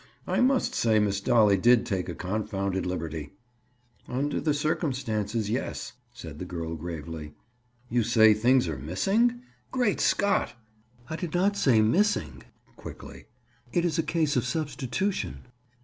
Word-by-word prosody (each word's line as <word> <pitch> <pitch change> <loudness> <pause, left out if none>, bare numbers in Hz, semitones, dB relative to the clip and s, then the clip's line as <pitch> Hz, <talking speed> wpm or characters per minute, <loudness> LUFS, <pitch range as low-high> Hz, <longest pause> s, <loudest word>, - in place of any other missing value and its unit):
"I - - 0
must 260 +1 +2
say 110 -2 +2
Miss 100 -2 +1
Dolly 105 -3 +4
did 120 +5 +4
take 95 -3 -2
a - - -5
confounded 100 -1 -2
liberty." 80 -4 -4 0.7
"Under 140 +4 -1
the 155 - +1
circumstances, 120 - -1
yes," 120 - -3 0.2
said 80 -11 -10
the 90 - -5
girl 85 -2 -5
gravely. 80 -2 -7 0.5
"You 120 0 +1
say 110 -1 +5
things 120 +1 +3
are 75 -5 -4
missing? 205 - +1 0.3
Great 245 -6 +1
Scott!" 200 -10 +1 0.5
"I 160 - -4
did 175 -1 -4
not 195 +3 +2
say 120 - +4
missing." 110 - +1 0.4
Quickly. - - -10 0.5
"It 175 0 +1
is 170 0 0
a - - +5
case 160 -2 0
of 125 - +2
substitution." 155 +6 -2
115 Hz, 140 wpm, -27 LUFS, -, 0.7 s, say